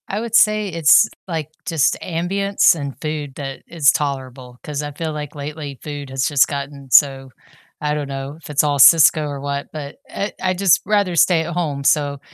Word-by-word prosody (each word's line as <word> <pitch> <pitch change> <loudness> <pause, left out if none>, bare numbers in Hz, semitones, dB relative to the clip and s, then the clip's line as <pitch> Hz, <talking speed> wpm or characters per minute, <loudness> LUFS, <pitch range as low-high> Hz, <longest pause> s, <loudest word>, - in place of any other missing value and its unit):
I 200 - -3
would 230 0 -3
say 215 -2 +4
it's, 165 +4 +5 0.2
like, 160 -4 -4 0.2
just 160 -4 +1
ambience 190 +3 +1
and 140 -4 -7
food 150 -3 -5
that 135 -2 -7
is 160 -5 +3
tolerable, 130 -4 -5
'cause 150 -1 -4
I 145 - -5
feel 155 +2 -5
like 150 -1 -7
lately 145 -1 -7
food 145 -2 -7
has 135 0 -2
just 145 -3 +3
gotten 140 -1 -7
so 135 -2 +4 0.5
I 150 0 0
don't 145 -2 -4
know 135 +2 -6
if 165 - -13
it's 145 - +2
all 145 -1 0
Cisco 155 +1 +6
or 140 -2 -6
what, 140 0 -4
but 145 -2 -7
I 200 - -4
I'd 185 -1 -1
just 195 -3 +4
rather 200 -3 +1
stay 165 +1 +3
at 170 - -5
home. 150 -5 -2
So 145 -1 +1
150 Hz, 195 wpm, -19 LUFS, 140-165 Hz, 0.5 s, Cisco